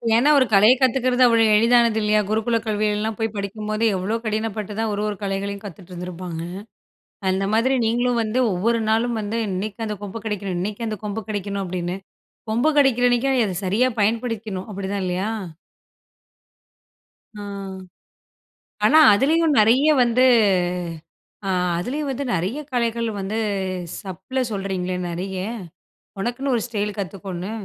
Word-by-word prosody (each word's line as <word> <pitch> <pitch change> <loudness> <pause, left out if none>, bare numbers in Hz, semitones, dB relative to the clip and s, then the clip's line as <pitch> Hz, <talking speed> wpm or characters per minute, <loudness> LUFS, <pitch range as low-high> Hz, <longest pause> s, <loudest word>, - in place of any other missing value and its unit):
ஏன்னா 250 +6 +4
ஒரு 260 - +5
கலைய 210 +4 +7
கத்துக்கிறது 255 -1 +2
அவ்வளோ 230 -1 +4
எளிதானது 235 0 +4
இல்லையா? 210 0 +3
குருக்குல 220 +2 +1
கல்விகள்லாம் 215 0 0
போய் 225 -1 -1
படிக்கும்போது, 215 +2 -3
எவ்வளோ 200 +5 -1
கடினப்பட்டு 215 -1 -2
தான் 225 -1 0
1, 205 - -2
1 210 - -2
கலைகளையும் 200 +1 -3
கத்துட்ருந்துருப்பாங்க. 180 -2 -7 0.9
அந்த 190 +1 0
மாதிரி 255 +4 +3
நீங்களும் 240 +1 +1
வந்து, 220 +3 -1
ஒவ்வொரு 230 +6 +1
நாளும் 230 +1 +1
வந்து, 215 +2 -2
"இன்னைக்கு 205 +4 -3
அந்த 210 -1 -4
கொம்பு 205 +2 -6
கெடைக்கணும் 200 -4 -3
இன்னைக்கு 210 +5 -3
அந்த 215 -1 -3
கொம்பு 210 +1 -4
கெடைக்கணும்." 200 -1 -3
அப்படீன்னு. 180 0 -3 0.5
கொம்பு 240 +7 +2
கெடைக்கிறன்னைக்கு 245 -1 +3
நீங்க 240 -4 +3
அத 185 -3 -4
சரியா 215 +8 +2
பயன்படுத்திக்ணும், 220 -2 -1
அப்படிதான் 200 0 -3
இல்லையா? 185 +4 -1 2.1
அ, - - -8 1.5
ஆனா 315 - +6
அதிலேயும் 305 +6 +3
நெறைய 250 +8 +5
வந்து, 245 +2 +3 1.2
அ - - 0 0.3
அதுலேயும் 275 - -3
வந்து 275 +2 -3
நெறைய 190 - -1
கலைகள் 235 -1 0
வந்து, 200 +3 -2 0.6
சப்ல 195 +7 -4
சொல்றீங்களே 190 -3 -2
நெறைய, 185 +3 -4 0.8
ஒனக்குன்னு 245 +6 -1
ஒரு 230 - 0
ஸ்டைல் 210 -3 -3
கத்துக்கோன்னு. 190 0 -5
215 Hz, 130 wpm, -22 LUFS, 195-235 Hz, 2.1 s, கலைய